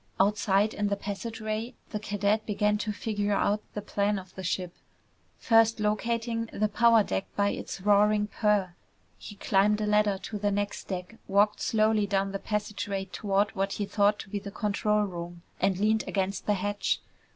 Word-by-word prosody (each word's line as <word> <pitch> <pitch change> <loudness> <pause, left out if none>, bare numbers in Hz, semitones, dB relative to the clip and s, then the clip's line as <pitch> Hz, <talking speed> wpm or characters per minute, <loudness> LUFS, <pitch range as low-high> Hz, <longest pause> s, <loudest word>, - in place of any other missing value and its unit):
Outside 205 +1 +2
in 205 0 -1
the 200 - 0
passageway, 215 +3 -4 0.2
the 210 - -2
cadet 205 +1 0
began 210 0 +1
to 215 0 -2
figure 205 -1 -1
out 205 +1 +1
the 210 - -4
plan 205 0 0
of 185 -1 -9
the 190 - -7
ship, 180 0 -2 0.6
first 225 -1 +4
locating 230 +2 -1
the 215 - 0
power 230 0 +5
deck 95 - -2
by 200 0 +2
its 195 - -5
roaring 210 +1 +4
purr. 210 -3 +1 0.5
He 205 - -9
climbed 200 +2 +2
a 215 - 0
ladder 210 -1 +3
to 210 - -5
the 205 0 +1
next 205 0 -2
deck, 185 +3 -5
walked 205 +2 +3
slowly 215 -2 +2
down 195 0 0
the 195 - -3
passageway 205 -2 -3
toward 200 +1 0
what 195 0 -1
he 205 - -2
thought 205 +1 +2
to - - -13
be 205 - -2
the 200 0 -7
control 210 +1 0
room, 175 -3 -6 0.2
and 190 -2 +2
leaned 215 +2 +2
against 195 0 -2
the 210 - +3
hatch. 205 +1 -1
205 Hz, 175 wpm, -28 LUFS, 195-215 Hz, 0.6 s, power